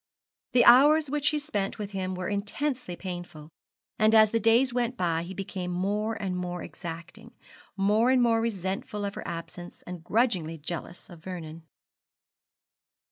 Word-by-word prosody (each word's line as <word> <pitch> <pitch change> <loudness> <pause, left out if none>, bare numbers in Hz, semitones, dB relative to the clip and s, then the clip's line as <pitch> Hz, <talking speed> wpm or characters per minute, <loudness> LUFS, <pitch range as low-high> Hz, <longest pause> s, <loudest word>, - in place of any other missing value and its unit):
The 245 - +5
hours 290 +4 +7
which 295 -1 -1
she 300 - +4
spent 210 -10 -3
with 205 -1 -5
him 185 -1 -3
were 180 -1 -4
intensely 205 +2 -3
painful, 175 -5 -7 0.5
and 215 +1 +5
as 215 -1 +7
the 230 - +2
days 235 +4 +3
went 245 0 -1
by 165 -2 0
he 180 +3 -7
became 185 -1 -5
more 205 +5 -1
and 190 -3 -2
more 180 -1 -4
exacting, 175 +7 -9 0.4
more 210 +5 +3
and 260 0 +4
more 230 -2 +3
resentful 205 -1 -3
of 200 - -3
her - - -7
absence, 170 +1 -8
and 175 -2 -8
grudgingly 185 -6 0
jealous 170 +3 -7
of 170 - -11
Vernon. 165 -3 -8
195 Hz, 155 wpm, -27 LUFS, 175-230 Hz, 0.5 s, hours